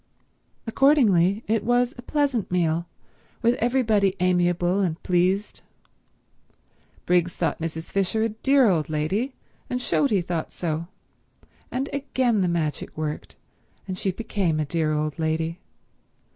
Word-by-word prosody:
Accordingly 225 - +3
it 220 -1 +1
was 245 +2 +2
a 245 - -9
pleasant 275 -5 0
meal, 170 -1 0 0.6
with 235 +1 +4
everybody 220 -5 +2
amiable 175 0 +2
and 175 -5 0
pleased. 185 +3 0 1.4
Briggs 175 -1 +2
thought - - -1
Mrs. 160 0 -5
Fisher 195 +3 +1
a 225 - +1
dear 265 +4 +3
old 165 -6 +1
lady, 190 - -1 0.3
and 250 - -1
showed 275 +3 +1
he 200 -4 +2
thought 170 -2 -3
so; 165 -1 -3 0.8
and 265 +2 -2
again 260 -6 0
the 185 - +2
magic 160 -4 -2
worked, 155 -1 -4 0.5
and 185 - -3
she 190 - -1
became 185 -5 -1
a 155 - 0
dear 155 +1 0
old 155 +1 -2
lady. 160 +2 -1
185 Hz, 130 wpm, -24 LUFS, 165-230 Hz, 1.4 s, with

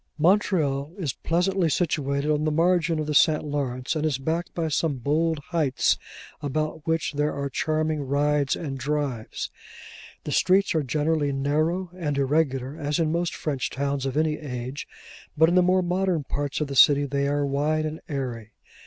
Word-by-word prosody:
Montreal 160 -5 +2
is 155 -10 -2
pleasantly 180 +1 0
situated 145 -3 0
on 150 0 +1
the 155 - +1
margin 170 0 +2
of 155 - -1
the 150 - -2
St. 155 +1 +4
Lawrence, 140 -2 -2
and 155 - -1
is 155 -4 +1
backed 160 +6 -2
by 165 -2 -1
some 155 0 0
bold 155 +6 +1
heights, 155 -6 +2 0.4
about 155 +2 -3
which 160 -1 0
there 150 +1 0
are 140 -1 -3
charming 155 0 0
rides 145 0 +1
and 135 -5 -5
drives. 140 -4 -3 0.7
The - - -5
streets 195 +2 +3
are 160 - +2
generally 150 +1 0
narrow 155 +6 0
and 150 -6 -2
irregular, 135 -1 0
as 145 -1 -1
in 160 -2 +1
most 170 +1 -1
French 140 -5 -2
towns 140 0 -2
of 135 +2 -3
any 155 -1 +1
age; 130 -2 -6 0.5
but 160 +2 +6
in - - +1
the 180 - +6
more 185 +1 +3
modern 180 -2 0
parts 145 +1 -3
of 150 - 0
the 140 - -5
city, 145 +1 +6
they 140 0 -1
are 145 0 +1
wide 150 +3 0
and 155 +1 -4
airy. 120 -6 -4
150 Hz, 175 wpm, -25 LUFS, 140-160 Hz, 0.7 s, but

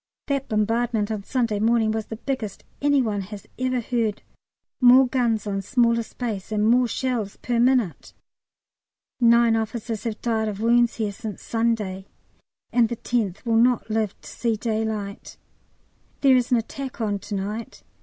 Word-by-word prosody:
That 275 -2 -2
bombardment 225 0 0
on 210 -2 -3
Sunday 230 -3 0
morning 225 0 +3
was 220 -1 -3
the 225 - -5
biggest 225 -4 -4 0.2
any 285 -2 +3
one 210 -3 -1
has 200 +1 -9
ever 255 -1 0
heard, 225 -3 -1 0.6
more 255 +1 +7
guns 235 -4 0
on 195 -1 -2
smaller 235 +2 +2
space, 220 -3 -5
and 210 0 +1
more 245 +2 +4
shells 235 -5 -2
per 240 -1 -1
minute. 245 -7 +1 1.1
Nine 235 -1 +5
officers 225 0 -3
have 220 -2 -3
"died 225 -2 0
of 205 -2 -4
wounds" 235 +1 +3
here 215 -3 -1
since 215 -1 -7
Sunday, 215 -5 -1 0.7
and 235 -2 +4
the 235 - -2
tenth 220 -3 -2
will 230 -1 +2
not 240 -1 +3
live 215 -2 -1
to - - -13
see 230 -2 -1
daylight. 215 -2 -3 0.8
There 270 -2 +6
is 250 -1 +2
an 245 - +4
attack 260 +4 -5
on 205 -3 -1
to 205 +2 -6
night. 210 +3 -5
225 Hz, 160 wpm, -24 LUFS, 210-245 Hz, 1.1 s, more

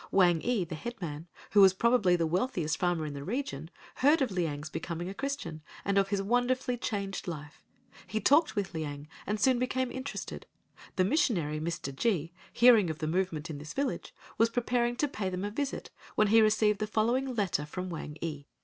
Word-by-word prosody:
Wang 175 -4 +4
ee, 240 -6 +1
the 170 -1 -7
headman, 165 -4 -6 0.2
who 205 - +6
was 190 -1 +7
probably 225 -4 +4
the 170 -1 +1
wealthiest 170 -2 0
farmer 175 -3 +1
in 150 - -5
the 140 0 -6
region, 190 - -3 0.3
heard 290 +5 +5
of 260 -6 0
Liang's 155 -5 -2
becoming 170 +2 -4
a - - -5
Christian, 270 - -4 0.2
and 200 - +1
of 195 0 +4
his 195 -1 -1
wonderfully 245 +3 +1
changed 200 -4 -3
life. 150 -4 -7 0.5
He 215 - -1
talked 290 - +4
with 200 -2 -2
Liang 145 -2 -5 0.2
and 210 +1 -1
soon 255 0 +3
became 255 0 0
interested. 260 +2 -6 0.5
The 185 - +3
Missionary, 180 - +1
Mr. 155 -4 -4
G——, 170 - 0 0.2
hearing 230 -7 +6
of 160 - -3
the 155 - -3
movement 165 -2 -1
in 145 - -6
this 150 +2 -8
village, 280 0 -2 0.3
was 230 - +5
preparing 240 0 0
to 295 - +1
pay 210 -8 -3
them 185 +1 -3
a 205 - -3
visit 280 +5 -3 0.2
when 215 -1 +3
he 225 +1 +7
received 215 -1 +3
the 215 - -1
following 240 +5 +1
letter 185 -8 0
from 180 +3 -5
Wang 155 -2 -6
ee. 150 -4 -5
195 Hz, 195 wpm, -30 LUFS, 160-240 Hz, 0.5 s, was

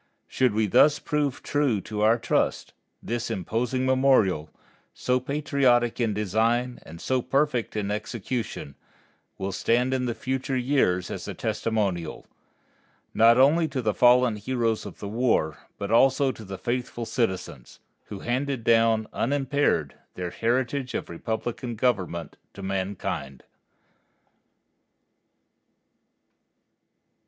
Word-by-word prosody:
Should 125 -5 +1
we 110 0 +2
thus 145 +9 +5
prove 145 -3 -2
true 145 -7 +1
to 105 +1 -5
our 110 +2 +4
trust, - - -1 0.3
this 120 0 -3
imposing 115 +5 -1
memorial, 130 - +3 0.5
so 125 0 +1
patriotic 130 -4 +1
in 115 -3 +1
design, 115 +5 0
and 85 +1 -12
so 130 +6 0
perfect 130 -2 0
in 105 -1 -2
execution, 110 - -4 0.6
will 95 +1 -3
stand 125 +7 +1
in 125 -2 0
future 130 +3 -2
years 120 -9 +1
as - - -6
a - - -5
testimonial, 100 -7 -2 0.9
not 115 +1 +6
only 155 +5 +5
to 135 -3 -4
the 110 -4 0
fallen 125 -1 +4
heroes 115 -1 -1
of - - -10
the 100 - -6
war, 110 - 0 0.2
but 100 0 -4
also 135 +3 +4
to 110 -2 -11
the 95 -1 -7
faithful 120 0 -3
citizens, 95 - -3 0.3
who 100 - -8
handed 130 0 -2
down 115 -1 +3
unimpaired 135 - 0 0.2
their 90 -1 -4
heritage 125 +4 -1
of - - -4
republican 115 +6 -4
government 95 - -1 0.2
to 100 - -8
mankind. 95 -9 -3
115 Hz, 120 wpm, -26 LUFS, 105-130 Hz, 0.9 s, not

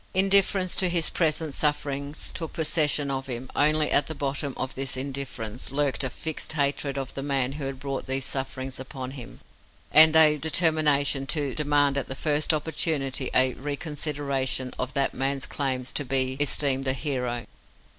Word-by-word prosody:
Indifference 195 -1 +3
to 185 - +3
his 170 -2 +2
present 160 -2 0
sufferings 145 -1 -1
took 165 -3 -5
possession 150 -3 +1
of 135 0 -3
him; 125 0 -6
only 155 +1 +3
at 145 - +3
the 160 - -6
bottom 140 -1 -2
of 130 - -3
this 130 -1 -2
indifference 130 -4 -5
lurked 140 -3 0
a 130 - -1
fixed 160 +4 -3
hatred 140 -1 -1
of 135 -1 -4
the 135 - -5
man 135 -2 -1
who 140 0 -5
had 135 -1 -5
brought 135 -1 -4
these 135 0 0
sufferings 130 -1 -3
upon 130 -1 -7
him, 130 -3 -10 0.5
and 160 +1 +8
a 155 -1 +6
determination 150 -3 +2
to 145 -4 0
demand 145 -2 +2
at - - -6
the 130 - -5
first 150 +2 +2
opportunity 150 -4 -1
a 130 0 +4
reconsideration 140 -2 -2
of 130 0 -3
that 140 -1 +1
man's 135 0 -1
claims 130 -3 -2
to 145 - -2
be 130 -1 0
esteemed 140 -2 +2
a 130 - +2
hero. 125 -3 -3
140 Hz, 165 wpm, -26 LUFS, 130-150 Hz, 0.5 s, and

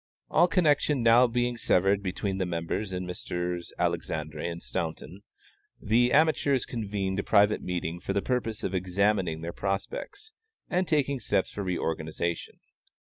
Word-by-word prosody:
All 175 - +5
connection 150 -6 +2
now 115 +2 +6
being 120 0 0
severed 95 -1 +2
between 95 0 -3
the 95 - +1
members 85 +4 -3
and 90 0 -3
Messrs. 90 -1 -3
Alexandre 80 -3 -2
and 85 +2 -3
Staunton, 85 +3 -5 0.6
the 120 +4 +3
amateurs 145 -3 +3
convened 100 -4 -2
a - - -1
private 105 0 +4
meeting 85 -1 -3
for 90 - -4
the 100 - +1
purpose 115 -4 -2
of 95 - -2
examining 90 -2 +1
their 85 +1 -5
prospects 100 - -4 0.4
and 180 0 0
taking 140 -3 +1
steps 95 -4 0
for 105 - -5
reorganization. 85 -2 -3
100 Hz, 140 wpm, -28 LUFS, 90-120 Hz, 0.6 s, now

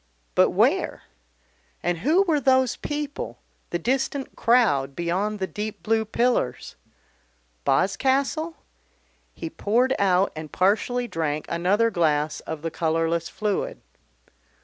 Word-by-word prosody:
But - - +5
where? - - +1 0.8
And 175 -1 0
who 315 - +3
were 325 -6 +2
those 260 -2 +3
people, 295 -1 -4 0.3
the 175 - -1
distant 265 - -1
crowd 170 - +3
beyond 185 +5 -1
the 190 - -1
deep 210 +2 -6
blue 220 0 +1
pillars? 235 - 0 0.9
Boscastle? 270 - +1 0.8
He 330 - -5
poured 250 -2 +1
out 190 -1 +3
and 155 -1 -7
partially 235 +6 +1
drank 155 -5 -2
another 200 +7 +2
glass 155 -4 +1
of 160 -1 -7
the 165 - -2
colourless 165 +1 0
fluid. 210 -2 -2
205 Hz, 115 wpm, -24 LUFS, 170-255 Hz, 0.9 s, But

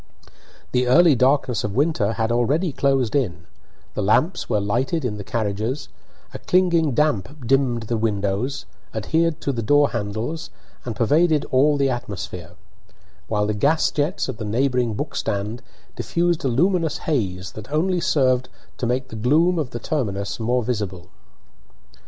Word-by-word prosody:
The 125 0 +1
early 165 +5 +6
darkness 130 -2 +2
of 105 -1 -3
winter 135 -8 +1
had 110 +1 -1
already 145 +9 +1
closed 135 -4 +1
in; 85 - -1 0.5
the - - -2
lamps 155 - +1
were 105 - +2
lighted 130 - -1
in 105 -4 -2
the 100 - -6
carriages; 110 +6 -2 0.4
a - - -6
clinging 170 -5 +2
damp 145 -2 0
dimmed 125 -2 +2
the 115 +1 -2
windows, 105 +4 -1 0.3
adhered 160 +9 0
to 140 - -1
the 120 -3 -3
door 145 +5 +3
handles, 115 +8 -3 0.4
and 120 -3 -4
pervaded 150 +7 +3
all 145 +3 +4
the 135 -1 +2
atmosphere; 95 -7 -6 0.7
while 105 -1 0
the 105 - 0
gas 140 +9 +2
jets 150 +6 -1
at 125 -4 -6
the - - -4
neighbouring 120 +1 0
book - - -4
stand 105 +4 -2 0.3
diffused 170 -1 0
a - - +1
luminous 165 +5 +1
haze 95 - -1
that 110 +5 -10
only 175 +4 +1
served 130 -4 +2 0.3
to 120 - -1
make 130 +2 -1
the 115 - -8
gloom 160 +10 +3
of 145 -5 -2
the 120 - -5
terminus 100 -12 -2
more 120 +2 +1
visible. 100 -6 -3
125 Hz, 155 wpm, -22 LUFS, 105-150 Hz, 0.7 s, early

